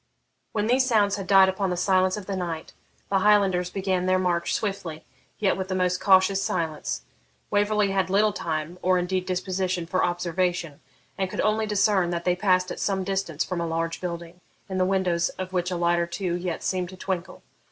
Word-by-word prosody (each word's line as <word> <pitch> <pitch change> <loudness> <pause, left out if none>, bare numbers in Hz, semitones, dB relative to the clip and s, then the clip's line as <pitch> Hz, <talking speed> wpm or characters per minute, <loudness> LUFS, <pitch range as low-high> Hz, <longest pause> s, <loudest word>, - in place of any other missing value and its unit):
When 210 -1 -1
these 250 +4 +3
sounds 205 -5 +3
had 195 -2 -6
died 195 -1 +7
upon 190 0 -1
the 180 - -2
silence 185 +1 +2
of 205 - -7
the 195 - -3
night, 170 -3 -4 0.4
the 195 - +3
Highlanders 190 -3 +3
began 185 -1 -1
their 185 0 +3
march 175 -2 0
swiftly, 180 -7 -3 0.3
yet 200 -3 +2
with 190 -1 -4
the 190 - -2
most 180 -1 +1
cautious 190 0 +4
silence. 155 - -2 0.5
Waverley 205 0 +2
had 190 -1 0
little 205 +2 +3
time, 165 -1 -4
or 185 0 +3
indeed 180 +1 -1
disposition, 185 -1 -1
for 185 +2 0
observation, 175 -3 -1 0.4
and 190 -1 0
could - - -2
only 215 +1 +1
discern 200 -3 +2
that 170 -1 -3
they 180 -1 +3
passed 185 -1 +2
at - - -6
some 195 -2 0
distance 190 -5 -1
from 180 -2 -3
a 170 - -1
large 165 0 -2
building, 170 0 -6 0.3
in 190 -1 -3
the 185 - +3
windows 180 -3 +1
of 185 0 -5
which 180 -1 0
a 180 - -2
light 170 0 +2
or 170 - 0
two 175 0 -3
yet 175 -1 -3
seemed 180 -2 -1
to 185 - -11
twinkle. 185 -1 -4
185 Hz, 200 wpm, -25 LUFS, 175-195 Hz, 0.5 s, died